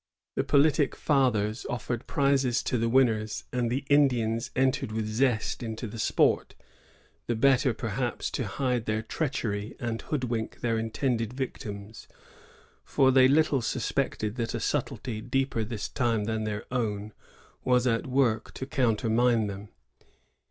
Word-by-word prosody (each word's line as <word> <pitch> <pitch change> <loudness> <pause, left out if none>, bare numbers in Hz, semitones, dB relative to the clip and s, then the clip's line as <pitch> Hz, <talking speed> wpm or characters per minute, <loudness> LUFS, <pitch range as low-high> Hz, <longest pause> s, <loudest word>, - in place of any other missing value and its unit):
The - - 0
politic 145 0 +3
fathers 120 -6 +1
offered 120 0 -3
prizes 140 -2 +2
to 125 - 0
the 115 +1 +1
winners, 115 -4 +2
and 120 -2 0
the 135 +3 -2
Indians 120 -6 +2
entered 130 -4 +1
with 110 0 -2
zest 110 +2 0
into 115 0 -4
the 110 +1 -7
sport, - - +2 0.7
the 120 - 0
better, 130 +2 +4
perhaps, 115 +2 -3
to 125 - -2
hide 125 +2 -1
their 110 +1 0
treachery 110 -6 -3
and 115 -2 -3
hoodwink 120 -6 -3
their 115 -2 +1
intended 115 0 -1
victims; 110 -5 -6 0.8
for 130 -1 +3
they 130 0 +6
little 145 -1 +3
suspected 115 -2 -2
that 115 -2 -2
a - - -2
subtlety, 110 -3 -2
deeper 135 -1 -1
this 110 -1 -4
time 115 -4 0
than* 110 0 -2
their 105 -1 -4
own, 110 -4 -2 0.5
was 125 -1 +3
at 115 -1 +1
work 125 -4 +1
to 130 - -4
countermine 120 -2 +2
them. 100 0 -6
120 Hz, 140 wpm, -28 LUFS, 110-130 Hz, 0.8 s, they